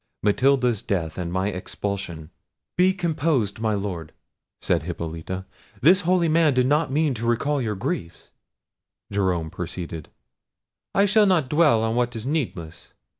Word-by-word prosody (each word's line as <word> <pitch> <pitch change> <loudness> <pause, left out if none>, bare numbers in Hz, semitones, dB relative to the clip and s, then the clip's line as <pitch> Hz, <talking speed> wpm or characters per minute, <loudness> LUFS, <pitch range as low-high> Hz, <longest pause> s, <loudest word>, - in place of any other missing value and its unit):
Matilda's 125 +1 +3
death 85 -3 -2
and 85 -1 -3
my 95 +2 0
expulsion—" 90 -4 -5 0.4
"Be 185 +1 +4
composed, 155 - 0
my 110 -1 0
Lord," 90 -6 -4 0.5
said - - +1
Hippolita; 85 +2 -5 0.3
"this 180 +8 +5
holy 180 -1 +2
man 160 -3 +3
did 125 0 +3
not 150 +2 +2
mean 150 0 +2
to 115 0 -4
recall 140 +5 +1
your 110 -3 -2
griefs." 85 -3 -5 0.8
Jerome 90 -5 0
proceeded. 85 -2 -6 0.9
"I 200 - +5
shall 210 +1 +4
not 165 -9 +2
dwell 150 -8 +4
on 110 0 0
what 120 0 0
is 115 0 -5
needless. 90 - -4
110 Hz, 140 wpm, -24 LUFS, 90-150 Hz, 0.9 s, this